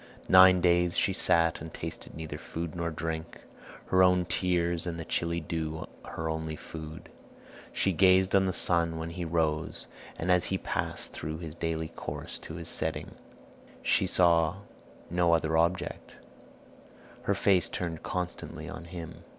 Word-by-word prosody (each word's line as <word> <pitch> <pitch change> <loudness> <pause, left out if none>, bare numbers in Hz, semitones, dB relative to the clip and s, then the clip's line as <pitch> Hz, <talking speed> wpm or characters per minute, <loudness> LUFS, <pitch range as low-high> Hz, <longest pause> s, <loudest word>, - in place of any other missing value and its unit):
Nine 95 -1 +8
days 85 0 +3
she - - +2
sat 85 0 +3
and 80 +1 -7
tasted 80 0 -7
neither 80 0 -6
food 85 -1 -5
nor 85 -1 -1
drink, 80 0 -5 0.5
her 95 - +4
own 90 -1 +5
tears 85 -1 0
and 85 -1 -4
the 80 - -5
chilly 85 -1 -1
dew 80 -1 -4 0.2
her 80 - -5
only 80 0 -3
food. 80 +1 -9 0.6
She 95 - +1
gazed 95 +1 +4
on 95 -1 +4
the - - +1
sun 85 -2 +3
when 80 +1 -4
he 90 +1 -5
rose, 80 -2 -1 0.3
and 90 +3 0
as 90 -1 +4
he 95 - 0
passed - - -3
through 80 +1 -5
his 80 -2 -7
daily 80 -1 -3
course - - -6
to - - -9
his - - -6
setting; - - -1 0.7
she 95 - +2
saw 85 +1 +3 0.5
no 85 -1 +3
other 80 -1 +2
object, 85 +3 0 1.1
her - - +2
face 95 -3 +3
turned 85 -3 -4
constantly 90 -1 -5
on - - -7
him. 85 -1 -8
85 Hz, 155 wpm, -29 LUFS, 80-90 Hz, 1.1 s, Nine